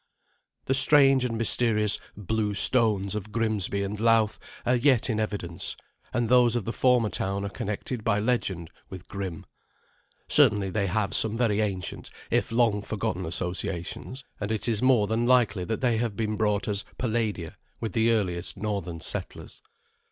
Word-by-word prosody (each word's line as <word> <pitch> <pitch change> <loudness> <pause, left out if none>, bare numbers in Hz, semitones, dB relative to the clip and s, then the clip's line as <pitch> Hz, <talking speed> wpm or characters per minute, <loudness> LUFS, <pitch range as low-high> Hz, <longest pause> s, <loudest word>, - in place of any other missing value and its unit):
The 135 - +1
strange 135 0 +5
and 115 -2 -2
mysterious 110 -2 +2 0.2
"blue 105 +1 -2
stones" 105 -4 +4
of 105 0 -5
Grimsby 105 -3 -1
and 100 +1 -4
Louth 115 -1 +2 0.3
are 125 - +3
yet 125 -1 +3
in 110 - -1
evidence, 100 -6 -3 0.4
and 120 -1 0
those 120 -1 +4
of 120 - -2
the 115 - -3
former 125 -4 +2
town 100 +1 -2
are - - -3
connected 105 +4 -4
by 105 -2 +1
legend 95 -8 -1 0.2
with 95 -2 -10
Grim. 95 -5 -6 0.8
Certainly 105 -10 +4
they 100 +1 0
have 100 +1 -1
some 110 0 +4
very 110 -4 +1
ancient 95 -4 -4 0.2
if - - +1
long 115 -3 +2
forgotten 95 -4 -3
associations, 90 +8 -3 0.2
and 105 0 -3
it 110 0 -2
is 110 -3 0
more 125 -5 +4
than 110 +3 -1
likely 110 -7 +2
that 110 +2 -3
they 120 -3 +2
have 115 -2 -2
been 110 0 -2
brought 105 -2 0
as 100 -2 -1
"palladia" 110 -8 -2 0.3
with 110 - -4
the 115 -1 +2
earliest 95 -5 -1
northern 95 -5 -4
settlers. - - -5
110 Hz, 160 wpm, -26 LUFS, 100-115 Hz, 0.8 s, strange